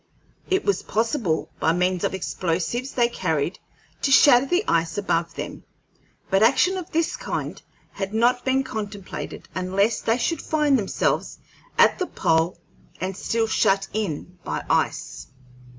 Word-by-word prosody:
It 380 +1 +1
was 405 - +1
possible, 225 - -1
by 160 - +2
means 180 0 0
of - - 0
explosives 190 +8 -2
they 240 -2 +3
carried, 165 -8 -2 0.4
to 275 - +1
shatter 265 -1 +7
the 355 +7 +2
ice 165 +2 +1
above 170 -4 -1
them; - - -6 0.7
but 195 +1 +3
action 275 +11 +4
of 365 -3 -5
this 330 0 0
kind - - -4 0.3
had 195 0 -4
not 240 +3 +2
been 265 0 +2
contemplated 205 -5 -6
unless 195 +4 0
they 225 +1 +1
should 330 +7 -1
find 300 -4 +2
themselves 200 - -1 0.4
at - - +5
the 365 - -1
pole 160 +2 +1 0.4
and 185 +1 -3
still 225 +3 0
shut 195 -3 +2
in 180 -3 -4
by - - -3
ice. - - -1
215 Hz, 145 wpm, -24 LUFS, 185-260 Hz, 0.7 s, shatter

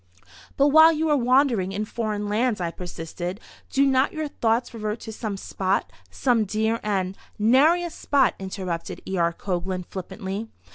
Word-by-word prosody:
"But 280 +1 +5
while 315 +2 +8
you 320 0 0
are 300 - +4
wandering 250 -7 +2
in 210 +2 -2
foreign 215 -2 -3
lands," 220 +1 +1
I 170 -2 -2
persisted, 175 +2 -6 0.3
"do 275 +1 +3
not 265 0 +3
your 315 -1 -2
thoughts 235 -3 0
revert 215 0 -3
to 220 - -7
some 215 -3 -4
spot—some 190 - -1
dear 220 +3 0
and—" 195 -3 -1 0.2
"Nary 275 +11 +4
a 345 - -4
spot," 280 -4 +2
interrupted 185 -2 -5
E. 190 - -2
R. 170 0 +3
Coglan, 180 +1 -3
flippantly. 195 +3 -6
215 Hz, 155 wpm, -24 LUFS, 185-255 Hz, 0.3 s, while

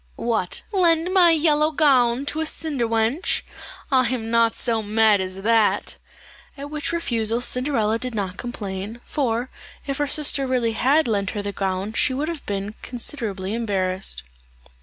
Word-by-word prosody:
"What, 220 -6 -1
lend 350 -2 +2
my 360 -3 +6
yellow 305 -1 +3
gown 270 -4 +3
to 310 +2 -2
a - - -1
cinder 290 -7 -1
wench! 225 +8 0 0.5
I 255 -2 +4
am 230 -3 -3
not 230 -1 +3
so 225 -2 0
mad 215 -1 +3
as 190 +1 -5
that;" 225 -1 +2 0.6
at 285 +1 -7
which 305 +1 -3
refusal 235 -9 0
Cinderella 245 -3 +1
did 250 -1 -3
not 190 -3 -3
complain, 210 -2 -6
for 250 -3 -2 0.3
if 275 0 -3
her 290 - +1
sister 280 -2 +1
really 245 -3 +1
had 270 +6 +2
lent 200 -3 0
her 205 - -2
the 200 - -3
gown 195 +1 -2
she 260 +2 +1
would 300 +4 -2
have 330 -4 -6
been 200 +1 -3
considerably 220 -6 -3
embarrassed. 190 - -1
235 Hz, 160 wpm, -23 LUFS, 210-285 Hz, 0.6 s, my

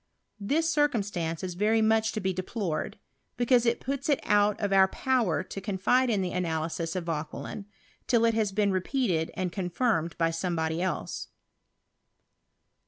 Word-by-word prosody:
This 295 +11 +1
circumstance 205 - 0
is 180 -1 -3
very 210 +5 +2
much 220 0 +3
to 215 - -2
be 190 -2 -1
deplored; 185 -2 -3 0.4
because 240 0 +3
it 235 - +2
puts 275 +3 -3
it 285 - +3
out 205 0 +3
of 200 -2 0
our 190 0 +6
power 235 -6 0
to 195 - -7
confide 210 +6 +2
in 200 -5 +1
an 180 - -4
analysis 165 -1 -2
of 185 - -2
Vauquelin, 165 +5 -5 0.4
till 235 -2 +3
it 230 - +3
has 220 -3 +1
been 200 0 +1
repeated 185 - 0
and 185 -1 -2
confirmed 180 -1 -1
by 165 -1 +2
somebody 165 -1 -1
else. 185 - -3
195 Hz, 155 wpm, -28 LUFS, 175-230 Hz, 0.4 s, our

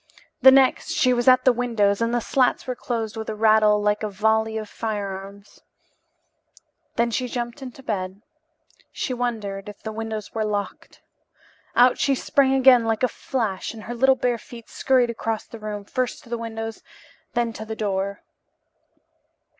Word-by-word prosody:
The 265 - +10
next 265 -1 +4
she 255 -5 +3
was 240 0 -1
at 255 0 +6
the 255 - +6
windows 225 -4 +1
and 230 0 +1
the 240 0 0
slats 255 +2 +1
were 255 - -2
closed 225 -3 -3
with 220 0 -5
a 215 - -3
rattle 215 -1 +4
like 210 0 +1
a 215 - -2
volley 220 +2 +1
of 215 -1 -5
firearms. 200 -2 -6 1.3
Then 235 0 +1
she 250 +3 -1
jumped 240 +2 -5
into 265 0 -9
bed. 195 -2 -4 0.7
She 255 - -3
wondered 210 -5 -3
if 205 - -13
the 220 - -4
windows 220 -1 -5
were 220 - -1
locked. 205 -1 -4 0.7
Out 250 +1 +5
she 275 - +2
sprang 270 +1 +2
again 260 -2 +6
like 225 +1 -1
a - - +5
flash, 225 -5 -3
and 220 - -10
her 240 - -5
little 265 +2 +4
bare 245 -2 0
feet 235 -1 -12
scurried 250 -3 +2
across 225 -1 -3
the 230 - -11
room, 210 -1 -6
first 255 +3 -3
to - - -17
the 240 - -1
windows 225 -1 -5
and - - -27 0.5
then 235 -1 0
to 220 - -7
the 220 0 -6
door. 200 -2 -2
225 Hz, 175 wpm, -23 LUFS, 210-245 Hz, 1.3 s, The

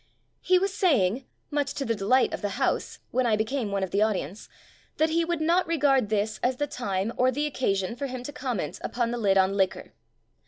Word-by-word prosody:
He 365 0 +4
was 385 +1 0
saying 255 - +2 0.3
(much 290 -1 -1
to 275 - -2
the 230 - +1
delight 225 +5 +2
of - - -4
the 205 -2 -3
house) - - -1
when 255 -1 +1
I 220 - +3
became 220 +1 -2
one 200 -1 -1
of 190 - -3
the 200 - +1
audience, 200 -3 -1 0.5
that 315 +1 +2
he 335 +1 +2
would 335 -1 -2
"not 340 +3 +2
re 335 0 0
gard 270 -6 +3
this 215 0 -1
as 255 +1 +1
the 290 - 0
time 205 -5 -2
or 255 +1 +4
the 290 +4 -1
occasion 200 -8 -1
for 275 +3 -3
him 255 -1 -6
to 290 - -7
conmient 250 - -3
upon 235 -1 -1
the 240 - -3
lid 195 -3 +3
on 190 0 +3
liquor". 190 -2 -1
245 Hz, 225 wpm, -26 LUFS, 200-290 Hz, 0.5 s, He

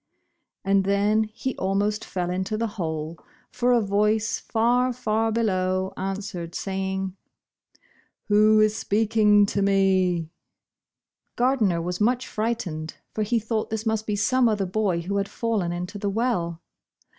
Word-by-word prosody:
And 195 0 +3
then, 205 +3 +2
he 225 +4 -5
almost 200 +2 0
fell 180 -1 -3
into 190 +4 -2
the 230 - 0
hole, 160 -6 -4 0.3
for 250 0 +1
a 240 -1 +4
voice 210 +2 +1
far, 245 +3 +1
far 225 -2 0
below 190 -4 0
answered, 190 -3 -5
saving, 190 -1 -3 1.1
"Who 215 +1 +4
is 215 0 +3
speaking 210 -1 +3
to 200 0 -1
me?" 190 -4 +2 1.0
Gardner 225 -9 +2
was 180 +3 -3
much 245 +4 +2
frightened, 205 -9 -3 0.2
for 220 - -2
he 225 +3 +1
thought 220 0 -2
this 220 0 -3
must 220 -1 -1
be 210 - 0
some 245 +4 +3
other 205 -3 0
boy 190 -2 0
who 200 +4 -2
had 200 0 -1
fallen 220 -7 -1
into 180 +4 -5
the 200 0 -1
well. 195 -7 -1
205 Hz, 140 wpm, -25 LUFS, 190-220 Hz, 1.1 s, a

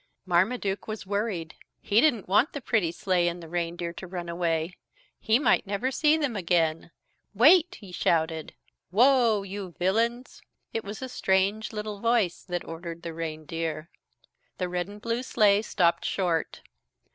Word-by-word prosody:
Marmaduke 195 +3 0
was 215 -3 -5
worried. 200 -5 -2 0.3
He 210 +3 +3
didn't 245 -10 +2
want 205 +10 +3
the 285 - -4
pretty 215 -9 +1
sleigh 175 0 +1
and 175 0 -2
the 165 - -10
reindeer 170 0 -3
to 185 - -8
run 175 -1 -6
away. 170 0 -1 0.4
He 220 +1 +3
might 250 -6 +2
never 205 +6 -1
see 305 +3 +3
them 285 -7 -1
again. 165 -4 0 0.5
"Wait!" 320 - +5
he 200 -4 -12
shouted. 160 -2 0 0.3
"Whoa 230 0 +4
you 195 -2 -7
villains!" 230 +7 0 0.3
It 225 - -2
was 205 +5 -7
a - - -3
strange 200 -1 0
little 210 -1 -5
voice 230 -5 +1
that 175 -2 -4
ordered 165 +1 -7
the 170 -1 -5
reindeer. 160 0 -4 0.7
The 180 - -1
red 180 0 -2
and 205 +1 -11
blue 230 +2 -2
sleigh 210 -5 +3
stopped 175 -5 +1
short. 175 -4 -1
190 Hz, 155 wpm, -27 LUFS, 170-220 Hz, 0.7 s, Wait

